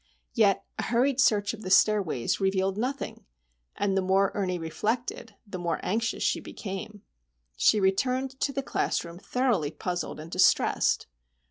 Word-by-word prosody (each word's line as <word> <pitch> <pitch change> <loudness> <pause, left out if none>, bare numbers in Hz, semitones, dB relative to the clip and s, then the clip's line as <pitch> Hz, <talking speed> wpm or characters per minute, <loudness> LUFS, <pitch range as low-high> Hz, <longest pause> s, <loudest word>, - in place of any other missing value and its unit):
Yet 205 -5 +3
a - - 0
hurried 250 +3 +1
search 205 -5 +3
of 220 - -9
the 185 - -5
stairways 190 - +3
revealed 190 0 +1
nothing; 255 +6 -4 0.5
and 200 -1 0
the 195 - +2
more 190 +1 +2
Ernie 185 -3 -1
reflected, 220 +6 -3
the 200 -3 -7
more 170 -2 -1
anxious 225 +4 -1
she - - +1
became. 200 +1 -7 0.5
She 215 - +4
returned 255 +7 0
to 280 - 0
the 275 0 -3
classroom 170 -8 -2
thoroughly 230 - 0
puzzled 175 +1 -4
and 160 +2 -9
distressed. 185 +1 +3
200 Hz, 145 wpm, -27 LUFS, 185-230 Hz, 0.5 s, She